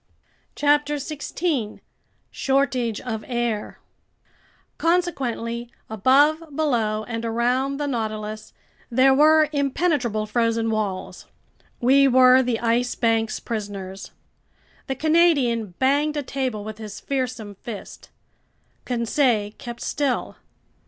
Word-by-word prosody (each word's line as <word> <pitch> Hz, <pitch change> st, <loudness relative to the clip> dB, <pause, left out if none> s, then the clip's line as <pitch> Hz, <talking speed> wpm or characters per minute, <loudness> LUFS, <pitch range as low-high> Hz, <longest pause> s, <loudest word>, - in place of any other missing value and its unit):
CHAPTER 295 Hz, 0 st, +2 dB
16 290 Hz, -4 st, -3 dB, 0.5 s
Shortage 260 Hz, -5 st, 0 dB
of 220 Hz, -4 st, -4 dB
Air 240 Hz, -4 st, -2 dB, 1.0 s
CONSEQUENTLY, 260 Hz, -9 st, -1 dB, 0.2 s
above, 275 Hz, +9 st, +4 dB
below, 230 Hz, -8 st, 0 dB
and 230 Hz, 0 st, -5 dB
around 245 Hz, +4 st, 0 dB
the 295 Hz, -, -2 dB
Nautilus, 215 Hz, -4 st, -4 dB, 0.4 s
there 260 Hz, +2 st, +4 dB
were 310 Hz, +2 st, +5 dB
impenetrable 280 Hz, -6 st, 0 dB
frozen 230 Hz, 0 st, 0 dB
walls. 205 Hz, -4 st, -3 dB, 0.5 s
We 275 Hz, +3 st, +5 dB
were 255 Hz, 0 st, +6 dB
the 245 Hz, -3 st, -1 dB
Ice 240 Hz, +1 st, +1 dB
Bank's 225 Hz, -2 st, 0 dB
prisoners! 200 Hz, -4 st, -6 dB, 0.8 s
The 265 Hz, -, -2 dB
Canadian 275 Hz, -, +2 dB
banged 290 Hz, +3 st, +1 dB
a 290 Hz, -, -1 dB
table 255 Hz, -6 st, -3 dB
with 215 Hz, +1 st, -8 dB
his 215 Hz, -2 st, -8 dB
fearsome 250 Hz, -6 st, -3 dB
fist. 205 Hz, +1 st, -9 dB, 0.8 s
Conseil 235 Hz, -3 st, +1 dB
kept 240 Hz, -3 st, -8 dB
still. 280 Hz, -4 st, -2 dB
245 Hz, 100 wpm, -23 LUFS, 225-280 Hz, 1.0 s, were